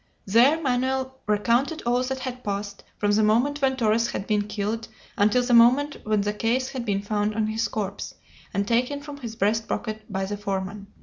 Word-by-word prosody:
There 240 +10 +5
Manoel 260 -1 0 0.2
recounted 235 +9 +1
all 245 +1 +2
that 265 +1 -2
had 255 -1 -5
passed, 200 0 -4
from 205 0 +1
the 210 +1 +3
moment 245 +8 +2
when 265 -1 +2
Torres 230 -1 +2
had 195 - -4
been 210 -1 0
killed 210 +2 -3 0.3
until 220 +3 +3
the 245 0 0
moment 255 +5 +5
when 215 -1 +2
the 205 +1 -1
case 240 +5 0
had 255 -3 -5
been 200 -2 -1
found 210 0 -1
on 220 -1 +1
his 220 +1 -1
corpse, 200 -2 -4 0.4
and 200 +1 -1
taken 250 +5 +1
from 290 -1 -8
his 235 -5 -7
breast 220 +2 +1
pocket 215 -1 -4
by 190 0 -1
the 205 +1 -4
foreman. 200 0 -4
225 Hz, 195 wpm, -25 LUFS, 205-255 Hz, 0.4 s, There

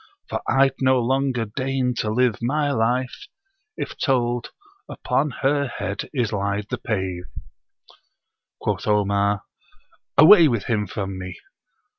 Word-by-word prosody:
For - - -3
I'd 135 0 +4
no 130 -1 +4
longer 130 -1 0
deign 130 +3 -1
to 105 - -1
live 120 0 +1
my 145 +4 0
life 125 +1 -1 0.5
If - - -5
told, 120 -3 0 0.4
"Upon 150 - -1
her 140 +1 +2
head 100 -4 -5
is 120 -6 -1
laid 100 +1 -2
the - - -2
pave."' 95 -4 -3 1.3
Quoth - - -2
Omar, 100 -1 +1 0.7
"Away 165 +2 +9
with 115 -7 0
him 105 -3 -1
from 95 0 -5
me! 90 -1 -7
120 Hz, 125 wpm, -23 LUFS, 100-135 Hz, 1.3 s, Away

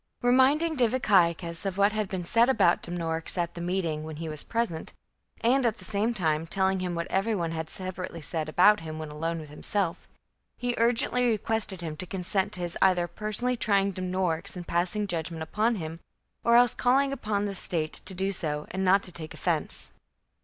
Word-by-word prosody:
Reminding 275 +6 +4
Diviciacus 185 -9 +2
of 195 -1 -3
what 200 +1 +4
had 215 -3 -1
been 185 -2 -3
said 230 +8 +3
about 200 -9 +3
Dumnorix 165 -1 -3
at 170 -1 -1
the 170 - -7
meeting, 170 -3 -1
when 155 0 -7
he 165 +2 -5
was 155 -1 -2
present, 230 -9 -2 0.5
and 255 +3 +3
at 230 -2 +1
the - - -9
same 215 +2 0
time 165 -7 0
telling 190 +1 +1
him 180 -1 -2
what 170 0 -2
every 215 +4 +1
one 170 -4 -2
had 160 -1 -4
sepa 185 +1 -6
rately 165 -2 -9
said 155 0 -2
about 195 +6 +5
him 155 -1 -7
when 155 -1 -6
alone 165 +2 -3
with 155 -2 -10
himself, 180 +3 -2 0.5
he 245 0 -1
urgently 240 +1 +2
requested 220 -4 -1
him 160 -3 -4
to 185 - -5
consent 190 +1 -1
to 180 - -3
his 175 -1 -2
either 180 -2 +4
personally 215 +6 0
trying 200 -4 +2
Dumnorix 185 -2 -2
and 180 -1 -6
passing 180 +5 +1
judge 170 -4 -2
ment 165 -2 -5
upon 215 +8 0
him, 165 -3 -6 0.4
or 235 - +4
else 245 -1 +6
calling 270 +2 +2
upon 210 -5 -1
the 200 - -3
state 165 -4 -1
to 190 - -5
do 190 +2 0
so, 150 -5 -1
and 190 +1 -2
not 195 +1 +4
to 180 - -3
take 160 -2 -8
offence. - - -1
185 Hz, 200 wpm, -27 LUFS, 165-215 Hz, 0.5 s, else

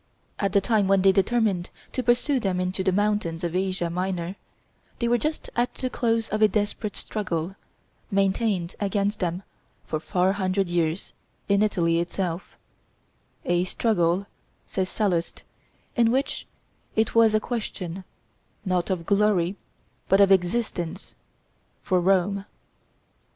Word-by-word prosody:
At 200 -2 0
the 200 - +5
time 205 -1 +2
when 195 -1 +4
they 195 - +7
determined 195 -2 +1 0.2
to 255 - -1
pursue 250 +3 +2
them 190 -5 -1
into 185 +1 -1
the 190 - +2
mountains 205 -4 0
of 170 0 -2
Asia 185 -2 0
Minor, 180 +1 -2 0.6
they 235 - 0
were 240 0 +3
just 305 +4 -3
at 240 +1 0
the 255 -1 -3
close 230 -1 +1
of 215 - -1
a 215 - +8
desperate 210 0 -2
struggle, 185 -4 -3 0.5
maintained 195 -2 +1
against 205 +1 0
them 180 +1 -2 0.4
for 155 - -2
four 185 +3 +1
hundred 190 -1 0
years, 170 0 -1 0.3
in 200 0 +3
Italy 170 -6 +2
itself; 175 0 -3 0.9
"a 175 0 +2
struggle," 185 -3 +1 0.4
says 185 -1 -2
Sallust, 180 -6 -1 0.5
"in 235 -2 +4
which 265 +4 -1 0.5
it 220 0 +1
was 225 -1 +5
a - - +4
question 195 -6 -4 0.6
not 180 -2 0
of 180 -3 -1
glory, 200 -2 +2 0.5
but 195 - +5
of 200 -1 +6
existence, 180 -2 0 0.7
for 185 -2 +2
Rome." 195 +2 +2
195 Hz, 135 wpm, -25 LUFS, 180-215 Hz, 0.9 s, a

